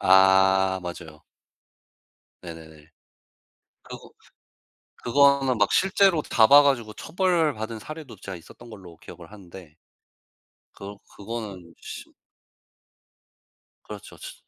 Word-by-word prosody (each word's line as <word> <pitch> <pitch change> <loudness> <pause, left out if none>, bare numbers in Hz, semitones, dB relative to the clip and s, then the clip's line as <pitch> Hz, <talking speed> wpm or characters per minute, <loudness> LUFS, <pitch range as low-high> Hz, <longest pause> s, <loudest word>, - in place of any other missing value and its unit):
아. 95 0 +4
맞아요. 85 -3 -10 1.2
네네네. 80 -2 -13 0.9
그거 - - -12 0.9
그거는 140 0 +3
막 105 -1 +1
실제로 190 -3 +2
잡아 140 +3 +5
가지고 120 -7 0
처벌받은 155 - -2
사례도 155 -2 -10
제가 95 - -8
있었던 115 +8 -16
걸로 95 -6 -13
기억을 85 +3 -14
하는데. 90 -5 -14 1.0
그러 100 0 -10 0.2
그거는 100 -6 -8
심 - - -10 1.7
그렇죠. 105 -1 -11
츠 - - -10
105 Hz, 210 characters per minute, -24 LUFS, 90-140 Hz, 1.7 s, 잡아